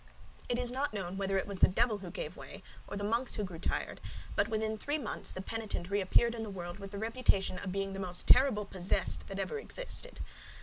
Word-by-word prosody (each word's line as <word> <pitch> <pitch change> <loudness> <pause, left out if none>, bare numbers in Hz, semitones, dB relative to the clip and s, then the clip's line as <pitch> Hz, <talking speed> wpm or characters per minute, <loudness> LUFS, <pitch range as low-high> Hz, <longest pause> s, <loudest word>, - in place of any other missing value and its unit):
It 240 - +2
is 245 -1 +1
not 265 -2 -1
known 190 -2 -2
whether 195 0 +1
it 190 - +1
was 200 -2 -5
the - - +8
devil 220 +2 +2
who 190 - -6
gave - - -4
way, - - -9 0.2
or 200 - -4
the 205 - -3
monks 230 +5 +1
who 210 - -1
grew 180 -4 -5
tired; - - -1 0.3
but 205 - +3
within 220 0 0
three 290 +8 0
months 255 -8 -3
the 185 - -5
penitent 215 -4 -3
reappeared 205 +4 +4
in 230 - -4
the 220 - -3
world 175 -1 -5
with 200 -1 -6
the 200 - -6
reputation 220 -4 +2
of 190 - -3
being 195 0 -1
the 195 - -4
most 180 -2 0
terrible 250 -6 +6
possessed 185 -2 -1
that - - -5
ever 450 - -1
existed. - - -4
205 Hz, 225 wpm, -33 LUFS, 195-235 Hz, 0.3 s, the